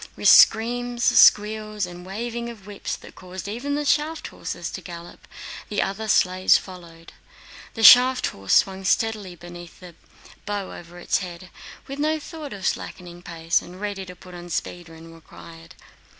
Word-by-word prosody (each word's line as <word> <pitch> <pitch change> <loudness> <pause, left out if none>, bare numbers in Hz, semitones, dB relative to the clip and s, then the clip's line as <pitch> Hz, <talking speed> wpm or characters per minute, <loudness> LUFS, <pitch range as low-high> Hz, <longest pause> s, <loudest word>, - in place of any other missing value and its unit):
With - - +3
screams, 240 +2 +4
squeals, 215 -1 +4
and 175 0 -10
waving 235 +5 -5
of 215 -5 -12
whips 205 -1 -5
that - - -14
caused 185 +1 -9
even 245 +7 -3
the 295 0 -2
shaft 305 +3 0
horses - - -6
to - - -7
gallop—the 175 +4 -9
other 200 +3 -2
sleighs 185 -2 +4
followed. 170 -3 -12 0.6
The 225 - -3
shaft 250 +4 +8
horse 95 0 -3
swung 190 0 +2
steadily 210 -2 -1
beneath 175 0 -12
the 180 -2 -12 0.5
bow 205 -2 -4
over 175 0 -12
its 175 - 0
head, 180 -1 -9 0.3
with 275 +1 -8
no 310 +1 0
thought 305 -1 -9
of 195 -2 -7
slackening 175 -1 -4
pace 165 -1 -1
and 180 +2 -12
ready 205 -1 -4
to 180 - -10
put 180 0 -15
on 175 0 -10
speed 175 0 -5
when 165 0 -13
required. 165 0 -14
190 Hz, 160 wpm, -23 LUFS, 175-225 Hz, 0.6 s, shaft